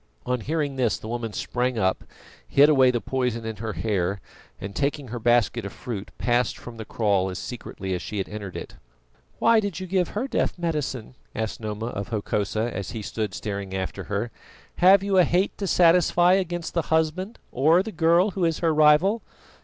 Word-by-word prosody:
On 125 0 0
hearing 145 0 -2
this 120 -4 +1
the - - -9
woman 115 -1 -3
sprang 125 +3 -2
up, 95 -3 +1 0.4
hid 145 +2 +6
away 135 -4 +5
the 120 -1 +1
poison 125 -3 -2
in 110 -1 -4
her 110 -1 -4
hair, 95 0 -1 0.4
and 100 0 -7
taking 140 -2 -1
her 120 +2 -4
basket 120 0 +2
of 100 - -5
fruit, 110 -5 -6
passed 120 0 +1
from 120 -1 -10
the 110 - -7
kraal 100 -4 +1
as 90 - -5
secretly 95 -5 -6
as 90 - -2
she 105 - -5
had 95 - -2
entered 105 -3 -7
it. - - -9 0.6
"Why 230 -1 +5
did 200 -5 -3
you 185 - -5
give 185 -1 +1
her 225 +6 -3
death - - -1
medicine?" 150 -9 -3 0.2
asked 110 -1 -3
Noma 110 +1 -4
of 100 -4 -5
Hokosa, 110 0 -2
as 95 -2 -4
he 110 -2 -6
stood 105 -1 -3
staring 100 -2 -4
after 95 -1 -4
her. 105 +3 -2 0.5
"Have 190 +2 +6
you 195 -1 +3
a - - +7
hate 180 +4 +1
to 200 - -2
satisfy 175 0 +5
against 175 -3 -1
the 170 - +1
husband 160 +7 0
or 160 +8 +4
the 220 - -6
girl 170 +3 +3
who 190 -1 -2
is 165 -2 +2
her 165 -2 +1
rival?" 155 +8 +4
125 Hz, 195 wpm, -25 LUFS, 110-170 Hz, 0.6 s, a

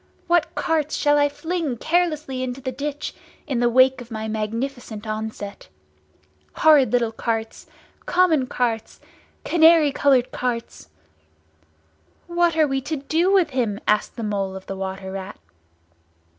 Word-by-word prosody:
What 345 -1 +1
carts 310 -2 0
I 290 0 +4
shall - - -6
fling 320 -3 -3
carelessly 310 -4 0
into 255 0 -4
the 260 -1 -4
ditch 285 +3 -4 0.3
in 260 -4 -2
the 240 0 +3
wake 255 +1 +4
of 240 - -11
my 220 -1 -5
magnificent 220 +1 -4
onset! 215 -2 -6 0.9
Horrid 300 -5 +5
little 240 -2 +1
carts—common 255 +7 -1
carts—canary 295 +7 +1
coloured 270 -3 +2
carts!" 235 - -4 1.4
"What 345 -1 +1
are 310 - +5
we 270 -1 -1
to 310 +4 -3
do 320 +6 +1
with 365 -6 +3
him?" 230 -6 -1
asked 210 0 +1
the 230 - -5
Mole 200 -2 -2
of 190 - -9
the 195 - -5
Water 190 0 -5
Rat. 190 - -7
255 Hz, 130 wpm, -22 LUFS, 220-305 Hz, 1.4 s, Horrid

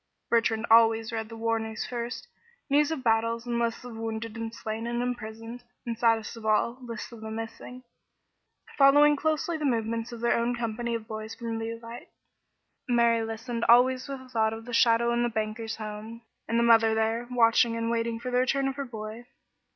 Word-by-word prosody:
Bertrand 225 -1 +2
always 225 0 +5
read 220 -1 -4
the 225 - -9
war 225 0 0
news 220 0 -4
first, 240 - -5 0.4
news 295 +1 +4
of 315 -5 -3
battles 230 +1 +1
and 240 -1 -1
lists 235 0 -1
of 245 -2 -8
wounded 225 0 -5
and 225 0 -4
slain 225 0 -5
and 240 0 -2
imprisoned, 230 0 -6 0.2
and 235 -1 -2
saddest 225 -1 +1
of 230 - -11
all, 220 +3 +1
lists 230 -2 -7
of 230 -2 -11
the 220 - -6
missing, 225 +3 -7 1.0
following 290 +2 +7
closely 315 +3 -1
the - - -4
movements 230 -2 -1
of 235 - -7
their 235 +1 +2
own 235 +1 0
company 235 0 -2
of 220 -1 -6
"boys" 220 0 -6
from 230 -2 -4
Leauvite. 230 +1 -7 0.8
Mary 235 -1 +3
listened 230 +1 -4
always 255 +2 +5
with 275 -1 -6
a 260 - -15
thought 220 -2 +1
of 225 0 -8
the 245 - -8
shadow 235 0 +4
in 240 - +1
the 240 - +1
banker's 220 0 -3
home, 215 +2 -7 0.2
and 230 - 0
the 235 - +3
mother 225 -1 +5
there, 225 +2 0
watching 230 -1 +3
and 230 0 -1
waiting 230 0 -1
for 250 +1 -5
the 250 - +2
return 270 +2 +1
of 270 +1 -3
her 280 - -3
boy. 225 0 -8
230 Hz, 195 wpm, -27 LUFS, 225-240 Hz, 1.0 s, following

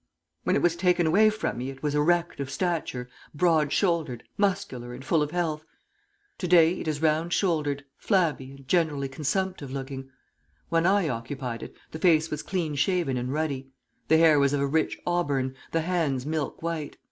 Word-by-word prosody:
When - - +2
it - - +1
was 175 -1 +3
taken 180 0 +2
away 205 +7 +5
from 215 - -3
me 130 +2 -3
it 135 +1 -10
was 150 -1 0
erect 170 +3 +1
of 140 -1 -3
stature, 140 -5 -2 0.3
broad 155 -3 +3
shouldered, 160 - 0
muscular 185 -12 -1
and 130 +1 -10
full 155 +2 +2
of 150 - 0
health. 160 -2 -2 0.8
To 180 - -2
day 170 -1 +5
it - - -5
is 155 0 -2
round 160 +2 +2
shouldered, 150 -6 0
flabby 165 -10 +1
and 135 -1 -14
generally 155 -5 +1
consumptive 155 +3 -2
looking. 135 0 -6 0.6
When 165 +1 +2
I 195 -3 +3
occupied 125 -1 -4
it, - - -9 0.2
the 160 - -6
face 160 -2 +3
was 150 0 -2
clean 170 -5 -2
shaven 150 -1 +1
and 125 +1 -2
ruddy. 140 -3 -2 0.4
The 160 - +5
hair 160 -2 +6
was 140 0 +3
of 145 - +1
a - - +2
rich 155 +3 0
auburn, 140 -7 0 0.2
the 165 - +1
hands 160 -7 0
milk 155 0 -3
white. 165 -3 -3
155 Hz, 180 wpm, -27 LUFS, 140-175 Hz, 0.8 s, hair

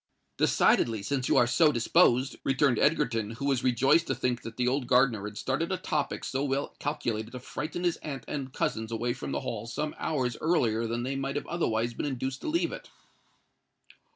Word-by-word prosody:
"Decidedly—since 115 +4 +2
you - - +4
are 120 - +6
so 150 +6 +4
disposed," 130 0 +3
returned 135 -3 +2
Egerton, 125 -8 +1
who 140 - -5
was 135 -4 +1
rejoiced 135 +7 +3
to - - 0
think 125 -1 -1
that 115 0 -9
the 125 -1 +1
old 130 0 0
gardener 125 -5 +3
had 105 0 -7
started 145 - -1
a 190 - 0
topic 155 -5 -2
so 135 +1 -2
well 140 0 -2
calculated 120 -7 -3
to 125 - -5
frighten 150 +7 -5
his 175 -2 +1
aunt 140 -3 -6
and 135 -3 -4
cousins 110 -3 -2
away 120 +1 -1
from 120 - -6
the - - -2
Hall 115 -4 -4
some 150 +6 -3
hours 130 -6 -1
earlier 115 -9 +1
than 120 +1 -2
they 135 +2 -2
might 135 0 -3
have 145 - -2
otherwise 120 -9 -1
been 145 - -3
induced 130 0 -3
to - - -5
leave 335 +2 +1
it. - - -8
130 Hz, 195 wpm, -29 LUFS, 120-145 Hz, -, are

